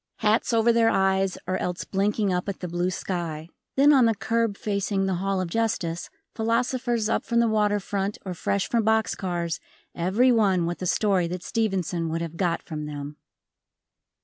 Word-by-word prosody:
Hats 220 Hz, +3 st, +1 dB
over 230 Hz, 0 st, +4 dB
their 230 Hz, -1 st, +4 dB
eyes 190 Hz, -1 st, +1 dB
or 185 Hz, +1 st, -1 dB
else 180 Hz, -1 st, -3 dB
blinking 200 Hz, 0 st, 0 dB
up 180 Hz, +2 st, -1 dB
at 195 Hz, -, -5 dB
the 180 Hz, -, -4 dB
blue 175 Hz, +1 st, -1 dB
sky. 170 Hz, -4 st, -4 dB, 0.3 s
Then 285 Hz, +2 st, +6 dB
on 260 Hz, -4 st, +6 dB
the 225 Hz, -1 st, +3 dB
curb 225 Hz, -1 st, 0 dB
facing 200 Hz, -1 st, -1 dB
the 190 Hz, -, 0 dB
Hall 195 Hz, 0 st, 0 dB
of 185 Hz, -, -1 dB
Justice, 175 Hz, -5 st, -1 dB, 0.2 s
philosophers 235 Hz, 0 st, 0 dB
up 225 Hz, -, 0 dB
from 235 Hz, 0 st, +1 dB
the 235 Hz, -, +4 dB
water 210 Hz, -1 st, +2 dB
front 200 Hz, +1 st, -3 dB
or 185 Hz, -, -3 dB
fresh 195 Hz, +3 st, -1 dB
from 235 Hz, -, +1 dB
box 220 Hz, 0 st, +2 dB
cars, 170 Hz, -3 st, -3 dB, 0.3 s
everyone 195 Hz, -1 st, +3 dB
with 175 Hz, +2 st, -4 dB
a 185 Hz, -, -1 dB
story 190 Hz, -2 st, +2 dB
that 180 Hz, +1 st, -5 dB
Stevenson 185 Hz, -7 st, -1 dB
would 165 Hz, +1 st, -2 dB
have 165 Hz, -1 st, -6 dB
got 170 Hz, -1 st, 0 dB
from 150 Hz, -2 st, -5 dB
them. 145 Hz, 0 st, -7 dB
195 Hz, 180 wpm, -25 LUFS, 175-225 Hz, 0.3 s, Then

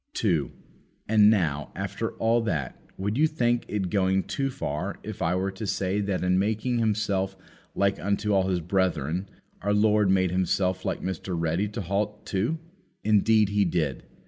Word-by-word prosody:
2. -, -, +1 dB, 0.6 s
And 105 Hz, -1 st, +6 dB
now, 80 Hz, -9 st, +1 dB
after -, -, -3 dB
all 115 Hz, +1 st, +2 dB
that, 80 Hz, -, -2 dB, 0.2 s
would 105 Hz, +6 st, -2 dB
you 160 Hz, -, +5 dB
think 120 Hz, -6 st, 0 dB
it 95 Hz, -4 st, -2 dB
going 95 Hz, -1 st, +2 dB
too 135 Hz, -1 st, -2 dB
far 75 Hz, -, -4 dB
if -, -, -7 dB
I 85 Hz, +2 st, +1 dB
were 95 Hz, +1 st, -1 dB
to 100 Hz, +2 st, -6 dB
say 95 Hz, +1 st, 0 dB
that 100 Hz, -2 st, -1 dB
in 90 Hz, 0 st, +3 dB
making 110 Hz, +4 st, 0 dB
Himself 100 Hz, -3 st, 0 dB, 0.4 s
like 100 Hz, 0 st, +1 dB
unto 100 Hz, +1 st, 0 dB
all 95 Hz, -1 st, +3 dB
His 90 Hz, -2 st, 0 dB
brethren, 90 Hz, -1 st, 0 dB, 0.3 s
our 100 Hz, +2 st, +1 dB
Lord 105 Hz, -1 st, +3 dB
made 95 Hz, -2 st, +3 dB
Himself 95 Hz, 0 st, 0 dB
like -, -, -2 dB
Mr. 95 Hz, 0 st, -3 dB
Ready 85 Hz, +5 st, 0 dB
to 105 Hz, +2 st, -5 dB
halt 105 Hz, +3 st, -2 dB
too? 110 Hz, +12 st, -1 dB, 0.5 s
Indeed 110 Hz, 0 st, +4 dB
He 100 Hz, 0 st, +2 dB
did. 80 Hz, -8 st, -1 dB
100 Hz, 170 wpm, -26 LUFS, 90-105 Hz, 0.6 s, And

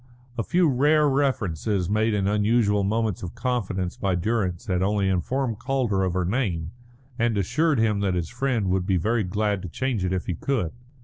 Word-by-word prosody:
A 115 Hz, -, -1 dB
few 175 Hz, +8 st, +2 dB
rare 150 Hz, +3 st, +3 dB
references 110 Hz, -, 0 dB
made 110 Hz, +2 st, +1 dB
in 100 Hz, -1 st, 0 dB
unusual 105 Hz, 0 st, +2 dB
moments 110 Hz, -1 st, 0 dB
of 90 Hz, +4 st, -7 dB
confidence 110 Hz, -7 st, -2 dB
by 95 Hz, -2 st, 0 dB
Durrance 90 Hz, -2 st, -1 dB
had 90 Hz, -4 st, 0 dB
only 100 Hz, 0 st, +1 dB
informed 115 Hz, +5 st, -1 dB
Calder 125 Hz, -7 st, 0 dB
of 95 Hz, -2 st, 0 dB
her 90 Hz, -1 st, +1 dB
name, 90 Hz, -7 st, -1 dB, 0.5 s
and 115 Hz, -2 st, +1 dB
assured 150 Hz, -, +1 dB
him 110 Hz, -2 st, +2 dB
that 95 Hz, -2 st, 0 dB
his 85 Hz, -2 st, -1 dB
friend 120 Hz, -5 st, -1 dB
would 95 Hz, 0 st, 0 dB
be 95 Hz, -3 st, +2 dB
very 110 Hz, +6 st, +1 dB
glad 105 Hz, +1 st, -1 dB
to 90 Hz, -, -6 dB
change 125 Hz, -1 st, -2 dB
it 90 Hz, -, 0 dB
if 95 Hz, -1 st, -2 dB
he 90 Hz, -, -2 dB
could. 110 Hz, -, -1 dB
105 Hz, 190 wpm, -25 LUFS, 95-120 Hz, 0.5 s, rare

